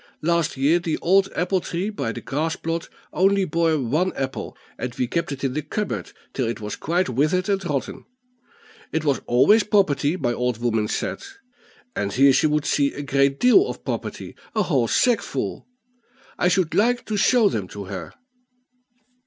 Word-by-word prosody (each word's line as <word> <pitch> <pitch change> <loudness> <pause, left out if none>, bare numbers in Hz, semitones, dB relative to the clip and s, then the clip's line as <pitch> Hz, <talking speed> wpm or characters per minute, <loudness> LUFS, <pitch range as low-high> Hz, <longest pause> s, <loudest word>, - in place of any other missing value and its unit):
Last 170 -2 +1
year 145 +6 +3
the 165 -2 -2
old 195 +2 +3
apple 180 +2 0
tree 180 +6 -3
by 155 - -3
the - - -7
grass 155 +4 -2
plot 165 0 -4 0.2
only 195 +1 +3
bore 165 -1 +1
one 150 +8 0
apple, 135 -1 -4 0.2
and 125 -1 -4
we 125 - 0
kept 170 +6 -2
it 140 -1 -6
in 135 -2 0
the 155 - -1
cupboard 205 +8 -4 0.2
till 130 -4 -1
it 115 +1 -3
was 105 -1 -5
quite 175 +4 0
withered 155 - +1
and 195 -1 0
rotten. 145 -5 -3 0.9
It 160 0 -1
was 140 -3 +1
always 170 - +5
property, 175 -7 +2
my 120 -7 0
old 125 -1 -1
woman 110 -2 0
said; - - -3 0.7
and 100 0 -2
here 135 +1 +5
she 140 - +3
would 150 0 0
see 140 -1 +2
a 145 - -5
great 140 0 +1
deal 370 - +5
of - - -7
property - - -5 0.2
a 215 - +2
whole 135 -10 +1
sackful; 245 - 0 0.7
I - - +1
should 180 -3 +1
like 240 +6 +2
to 215 - -3
show 225 +2 +4
them 105 - -2
to 100 +2 -8
her." 95 -4 -7
155 Hz, 180 wpm, -23 LUFS, 130-185 Hz, 0.9 s, always